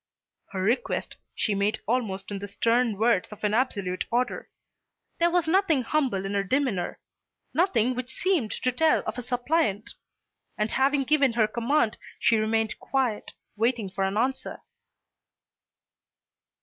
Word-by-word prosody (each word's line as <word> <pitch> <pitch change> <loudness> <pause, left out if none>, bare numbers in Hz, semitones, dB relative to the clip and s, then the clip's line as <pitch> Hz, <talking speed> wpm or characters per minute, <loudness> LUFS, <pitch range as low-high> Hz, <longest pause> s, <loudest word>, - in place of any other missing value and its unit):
Her 190 -1 -4
request 230 +7 -1 0.2
she 210 - 0
made 200 +2 0
almost 210 -5 -2
in 200 - -3
the 205 - -6
stern 230 +2 +1
words 220 -3 +2
of 210 - -11
an 210 0 +1
absolute 200 -7 0
order. 245 +2 -1 0.7
There 340 0 +4
was 345 -1 +1
nothing 330 -6 +3
humble 245 -8 0
in 195 - -3
her 200 -1 +1
demeanour, 205 -5 -1 0.5
nothing 255 - +2
which 255 +1 -5
seemed 355 - +1
to 255 - -1
tell 315 +5 +2
of 220 +3 -3
a - - -3
suppliant. 245 -3 0 0.6
And 210 +1 0
having 275 +1 +2
given 275 -2 +3
her 225 -2 +3
command 235 +1 0 0.2
she 225 0 +3
remained 220 0 0
quiet, 255 -6 -1 0.2
waiting 225 -2 0
for 195 +1 -2
an 195 +2 -1
answer. 260 +4 -1
235 Hz, 145 wpm, -26 LUFS, 210-265 Hz, 0.7 s, There